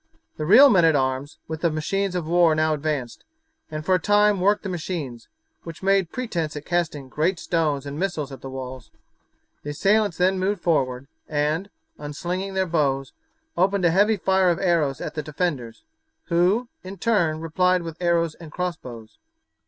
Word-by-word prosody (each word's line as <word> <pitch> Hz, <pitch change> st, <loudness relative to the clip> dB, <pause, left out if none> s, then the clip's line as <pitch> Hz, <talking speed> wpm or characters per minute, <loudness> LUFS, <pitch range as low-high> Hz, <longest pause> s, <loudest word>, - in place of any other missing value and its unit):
The 155 Hz, -, -3 dB
real 260 Hz, -, +8 dB
men 185 Hz, -5 st, +5 dB
at 160 Hz, -2 st, +5 dB
arms 130 Hz, +2 st, -1 dB
with 160 Hz, 0 st, -5 dB
the 170 Hz, -, +3 dB
machines 185 Hz, +5 st, -2 dB
of 175 Hz, -3 st, -2 dB
war 170 Hz, -1 st, +4 dB
now 155 Hz, 0 st, +2 dB
advanced, 145 Hz, -5 st, -3 dB, 0.5 s
and 155 Hz, 0 st, -6 dB
for 190 Hz, -, +2 dB
a 185 Hz, -, +3 dB
time 205 Hz, +1 st, +3 dB
worked 205 Hz, +2 st, +2 dB
the -, -, -4 dB
machines, 155 Hz, -9 st, -5 dB, 0.3 s
which 165 Hz, +2 st, -10 dB
made 195 Hz, -3 st, +2 dB
pretence 170 Hz, -12 st, -3 dB
at 150 Hz, -, -7 dB
casting 160 Hz, -6 st, -1 dB
great 160 Hz, +7 st, 0 dB
stones 155 Hz, -5 st, -1 dB
and 140 Hz, +1 st, -6 dB
missiles 160 Hz, -7 st, -2 dB
at 135 Hz, -, -9 dB
the 135 Hz, -, -7 dB
walls. 130 Hz, -2 st, -7 dB, 0.7 s
The 145 Hz, -, -7 dB
assailants 200 Hz, +4 st, +1 dB
then 185 Hz, +1 st, +2 dB
moved 195 Hz, +1 st, 0 dB
forward 130 Hz, -6 st, 0 dB, 0.2 s
and, 155 Hz, +6 st, -1 dB, 0.3 s
unslinging 180 Hz, +6 st, -4 dB
their 190 Hz, 0 st, +1 dB
bows, 140 Hz, -5 st, 0 dB, 0.4 s
opened 195 Hz, +1 st, +2 dB
a 170 Hz, -, +4 dB
heavy 205 Hz, +4 st, +3 dB
fire 190 Hz, -1 st, +2 dB
of 170 Hz, -, +1 dB
arrows 165 Hz, -8 st, +1 dB
at -, -, -5 dB
the 155 Hz, -, -3 dB
defenders, 145 Hz, -6 st, -3 dB, 0.5 s
who, 185 Hz, +8 st, +2 dB, 0.2 s
in 190 Hz, +2 st, -8 dB
turn, 170 Hz, -7 st, +1 dB
replied 180 Hz, +3 st, +1 dB
with 165 Hz, +1 st, -8 dB
arrows 170 Hz, -2 st, +1 dB
and 160 Hz, -2 st, -12 dB
cross 180 Hz, 0 st, -2 dB
bows. 115 Hz, -3 st, -12 dB
165 Hz, 175 wpm, -23 LUFS, 150-185 Hz, 0.7 s, real